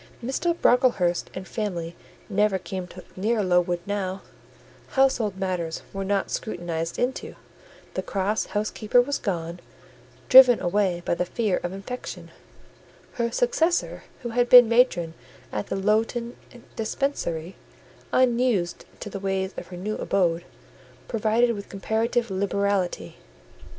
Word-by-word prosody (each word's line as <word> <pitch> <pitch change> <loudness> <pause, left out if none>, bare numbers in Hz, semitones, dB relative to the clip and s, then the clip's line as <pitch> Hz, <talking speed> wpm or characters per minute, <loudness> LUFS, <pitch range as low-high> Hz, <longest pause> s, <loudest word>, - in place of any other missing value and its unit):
Mr. 335 +7 -1
Brocklehurst 240 -9 +3
and 185 - -6
his - - -16
family 175 -6 -3 0.3
never 205 -1 +2
came 185 -1 -6 0.3
near 215 +3 0
Lowood 180 -1 +2
now: 195 -2 -3 0.7
household 235 -7 +2
matters 180 -4 -3
were 195 0 -3
not 195 0 -1
scrutinised 170 -5 -3
into; 250 +2 -2 0.6
the - - -2
cross 200 +2 -1
housekeeper 215 +2 +1
was 280 +4 +1
gone, 170 -4 -3 0.7
driven 255 -2 +9
away 180 -1 0
by - - +1
the 175 - 0
fear 205 +1 -1
of 175 - -3
infection; 200 +6 -7 0.9
her 235 - +1
successor, 355 - +1 0.2
who 240 - -3
had 240 +1 +1
been 245 -2 +10
matron 225 -9 +2 0.4
at 105 - -3
the - - -2
Lowton 225 +4 0 0.4
Dispensary, 205 - -2 0.6
unused 240 -8 +1 0.2
to - - -5
the 195 - -5
ways 190 0 -2
of - - -7
her 180 - -9
new 210 +4 -3
abode, 175 -3 +1 0.6
provided 230 +1 +2
with 200 -2 -8
comparative 225 +3 -1
liberality. 195 - -1
200 Hz, 125 wpm, -25 LUFS, 180-235 Hz, 0.9 s, been